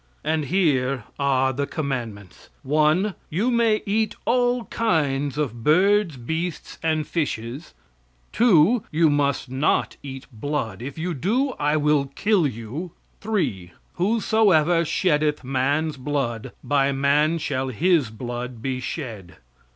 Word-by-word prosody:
And 155 Hz, -1 st, 0 dB
here 135 Hz, -, +1 dB, 0.2 s
are 135 Hz, -1 st, +2 dB
the 140 Hz, +2 st, -2 dB
commandments: 120 Hz, -, -5 dB
1. 155 Hz, +8 st, +2 dB, 0.2 s
You 205 Hz, +10 st, 0 dB
may 230 Hz, -3 st, +2 dB
eat 215 Hz, +1 st, 0 dB
all 245 Hz, 0 st, +2 dB
kinds 145 Hz, -, 0 dB
of 120 Hz, -6 st, -3 dB
birds, 185 Hz, -, +3 dB
beasts 160 Hz, +7 st, -4 dB
and 155 Hz, -2 st, 0 dB
fishes. 140 Hz, -2 st, -4 dB, 0.6 s
2. 220 Hz, 0 st, +4 dB
You 160 Hz, -1 st, +3 dB
must 140 Hz, -3 st, 0 dB
not 135 Hz, +3 st, 0 dB
eat 135 Hz, -1 st, -8 dB
blood; 115 Hz, -4 st, -3 dB
if 135 Hz, +4 st, -7 dB
you 170 Hz, +2 st, -2 dB
do, 235 Hz, -, 0 dB
I 150 Hz, +1 st, +2 dB
will 150 Hz, -1 st, +2 dB
kill 200 Hz, -7 st, +2 dB
you. 130 Hz, +8 st, -6 dB, 0.3 s
3. 105 Hz, -, -2 dB, 0.2 s
Whosoever 185 Hz, -5 st, +3 dB
sheddeth 150 Hz, -3 st, +1 dB
man's 140 Hz, +4 st, 0 dB
blood, 130 Hz, -5 st, -3 dB
by 140 Hz, -1 st, +2 dB
man 145 Hz, +4 st, +2 dB
shall 135 Hz, -4 st, -2 dB
his 155 Hz, 0 st, +2 dB
blood 120 Hz, +2 st, -6 dB
be 130 Hz, +2 st, -3 dB
shed. 115 Hz, -, -6 dB
150 Hz, 125 wpm, -23 LUFS, 130-175 Hz, 0.6 s, 2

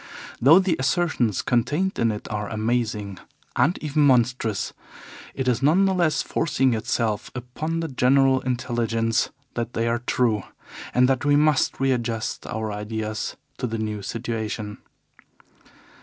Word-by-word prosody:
Though 145 Hz, +8 st, +8 dB
the 185 Hz, -3 st, +2 dB
assertions 130 Hz, -, +1 dB
contained 150 Hz, -, 0 dB
in 115 Hz, -1 st, +3 dB
it 105 Hz, -, -6 dB
are 105 Hz, -1 st, -3 dB
amazing 110 Hz, -3 st, -2 dB, 0.4 s
and 165 Hz, +6 st, +2 dB
even 150 Hz, 0 st, +1 dB
monstrous, 125 Hz, -5 st, +2 dB, 0.6 s
it 130 Hz, -1 st, -2 dB
is 125 Hz, -1 st, +1 dB
none 165 Hz, +8 st, +4 dB
the 190 Hz, -, +2 dB
less 170 Hz, -6 st, +1 dB
forcing 135 Hz, -5 st, +1 dB
itself 110 Hz, -1 st, -1 dB
upon 155 Hz, +7 st, -3 dB
the 165 Hz, -, -2 dB
general 135 Hz, 0 st, +3 dB
intelligence 120 Hz, -2 st, 0 dB, 0.2 s
that 120 Hz, 0 st, -3 dB
they 115 Hz, +1 st, 0 dB
are 120 Hz, 0 st, +1 dB
true, 120 Hz, -3 st, +1 dB, 0.5 s
and 125 Hz, +1 st, +4 dB
that 130 Hz, -2 st, +1 dB
we 145 Hz, 0 st, +4 dB
must 150 Hz, -1 st, +2 dB
readjust 120 Hz, -4 st, -1 dB
our 110 Hz, -1 st, -3 dB
ideas 110 Hz, +1 st, -4 dB, 0.2 s
to 125 Hz, -, -1 dB
the 115 Hz, 0 st, -3 dB
new 105 Hz, -1 st, -3 dB
situation. 110 Hz, -1 st, -4 dB
120 Hz, 140 wpm, -24 LUFS, 110-135 Hz, 0.6 s, Though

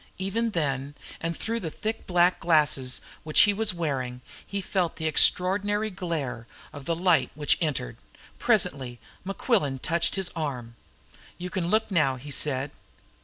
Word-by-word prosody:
Even 210 Hz, +5 st, -1 dB
then, 140 Hz, -, -2 dB, 0.2 s
and 165 Hz, 0 st, -3 dB
through 230 Hz, +2 st, -2 dB
the 170 Hz, -, -4 dB
thick 220 Hz, +7 st, -5 dB
black 180 Hz, 0 st, +3 dB
glasses 150 Hz, -6 st, +2 dB, 0.2 s
which 155 Hz, -1 st, +4 dB
he 205 Hz, -, +5 dB
was 215 Hz, +1 st, +2 dB
wearing, 135 Hz, -8 st, -3 dB, 0.2 s
he 200 Hz, -, -4 dB
felt 185 Hz, -3 st, -1 dB
the 160 Hz, -, -5 dB
extraordinary 205 Hz, +6 st, +4 dB
glare 155 Hz, -11 st, -4 dB, 0.3 s
of 145 Hz, -2 st, -10 dB
the 165 Hz, -, 0 dB
light 175 Hz, 0 st, +2 dB
which 150 Hz, -1 st, +3 dB
entered. 145 Hz, -, -2 dB, 0.4 s
Presently 130 Hz, -3 st, +1 dB, 0.3 s
Mequillen 195 Hz, -, 0 dB
touched 165 Hz, +5 st, 0 dB
his 190 Hz, -2 st, -1 dB
arm. 125 Hz, -7 st, -4 dB, 0.6 s
"You 180 Hz, +1 st, -6 dB
can 185 Hz, -4 st, -2 dB
look 220 Hz, +1 st, +1 dB
now," 150 Hz, -7 st, +2 dB
he 140 Hz, +3 st, -10 dB
said. 140 Hz, -1 st, -1 dB
165 Hz, 150 wpm, -26 LUFS, 140-190 Hz, 0.6 s, he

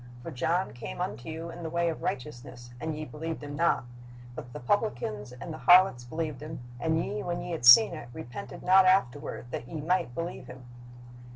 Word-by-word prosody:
For 165 Hz, -, -6 dB
John 170 Hz, +7 st, 0 dB
came 60 Hz, -, -7 dB
unto 115 Hz, +8 st, -4 dB
you 165 Hz, +1 st, -6 dB
in 170 Hz, +1 st, -9 dB
the 165 Hz, -, -4 dB
way 170 Hz, +1 st, 0 dB
of 165 Hz, -, -3 dB
righteousness, 125 Hz, -2 st, -5 dB
and 160 Hz, -1 st, -3 dB
ye 155 Hz, -, -5 dB
believed 160 Hz, +1 st, -6 dB
him 145 Hz, 0 st, -6 dB
not; 170 Hz, -3 st, +2 dB, 0.5 s
but 120 Hz, 0 st, -9 dB
the -, -, -7 dB
publicans 120 Hz, -, -1 dB
and 125 Hz, +7 st, -8 dB
the 155 Hz, -, -8 dB
harlots 180 Hz, -9 st, +6 dB
believed 155 Hz, 0 st, -4 dB
him: 155 Hz, -1 st, -7 dB, 0.2 s
and 160 Hz, +6 st, +1 dB
ye, 210 Hz, +1 st, -4 dB
when 175 Hz, -1 st, -3 dB
ye 175 Hz, -, -6 dB
had 140 Hz, -8 st, 0 dB
seen 170 Hz, -, +9 dB
it, 155 Hz, -7 st, -8 dB
repented 120 Hz, +1 st, -8 dB
not 190 Hz, +1 st, +6 dB
afterward, 145 Hz, -8 st, +1 dB
that 120 Hz, -, -5 dB
ye 160 Hz, -, -6 dB
might 165 Hz, -4 st, 0 dB
believe 170 Hz, +1 st, -5 dB
him." 125 Hz, 0 st, -11 dB
155 Hz, 200 wpm, -28 LUFS, 125-170 Hz, 0.5 s, seen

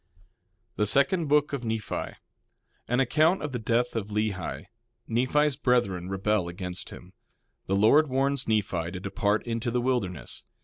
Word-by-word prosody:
THE 105 Hz, -, +2 dB
SECOND 160 Hz, -, +3 dB
BOOK 150 Hz, 0 st, +2 dB
OF 135 Hz, -3 st, -3 dB
NEPHI 110 Hz, -2 st, -3 dB, 0.7 s
An 125 Hz, +2 st, +1 dB
account 155 Hz, +8 st, +3 dB
of 150 Hz, -, -3 dB
the 125 Hz, -, -3 dB
death 115 Hz, +2 st, 0 dB
of 110 Hz, -3 st, -2 dB
Lehi. 100 Hz, -9 st, -3 dB, 0.4 s
Nephi's 130 Hz, +5 st, +2 dB
brethren 100 Hz, -10 st, 0 dB
rebel 95 Hz, -1 st, 0 dB
against 90 Hz, +1 st, -5 dB
him. 90 Hz, +1 st, -12 dB, 0.5 s
The 95 Hz, -, +1 dB
Lord 140 Hz, +10 st, +5 dB
warns 135 Hz, +1 st, 0 dB
Nephi 95 Hz, -6 st, 0 dB
to 90 Hz, -, -5 dB
depart 100 Hz, +2 st, -1 dB
into 115 Hz, 0 st, -2 dB
the 125 Hz, +1 st, 0 dB
wilderness. 120 Hz, -, -2 dB
115 Hz, 145 wpm, -27 LUFS, 95-135 Hz, 0.7 s, Lord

